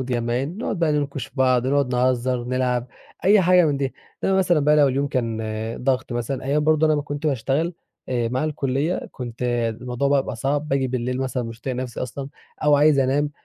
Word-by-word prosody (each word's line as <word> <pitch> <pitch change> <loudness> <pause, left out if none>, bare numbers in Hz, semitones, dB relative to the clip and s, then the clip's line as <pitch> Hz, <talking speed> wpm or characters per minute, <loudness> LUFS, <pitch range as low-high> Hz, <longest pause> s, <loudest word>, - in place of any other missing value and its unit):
متجمّعين، 125 - -2
نقعُد 215 - -2
بقى 165 -3 +2
نِنكُش 140 -3 -2
في - - -21
بعض، 130 -1 +3
نقعُد 135 -2 +1
نهزَّر 125 0 +1
ونلعب 125 0 -1 0.4
أي 205 +2 +6
حاجة 180 -1 +5
من 145 -2 +1
دي، 135 -1 -2 0.3
إنّما 190 0 +3
مثلًا 175 -4 +3
بقى 150 +1 +4
لو 145 -2 +5
اليوم 135 +2 0
كان 115 -4 -1 0.4
ضغط 130 -3 0
مثلًا، 120 +3 -3
أيام 145 +3 +1
برضه 155 0 +4
أنا 155 - +3
ما 145 - 0
كنت 145 +2 -4
باشتغل 145 +5 0 0.3
آآ 120 -2 0
مع 130 +5 -1
الكُلِّيّة، 145 +2 -1
كنت 120 -2 -7 0.4
الموضوع 125 +2 -1
بقى 140 -1 +4
بيبقى 115 - -6
صعب، 145 +5 -1
باجي 135 -2 +1
بالليل 125 +1 -2
مثلًا 130 -1 -2
مش 115 0 -8
طايق 130 -2 -3
نفسي 125 -2 -4
أصلًا، 135 +2 -5 0.4
أو 150 -1 +5
عايز 145 0 +4
أنام، 140 +3 +2
135 Hz, 200 wpm, -23 LUFS, 125-150 Hz, 0.4 s, أي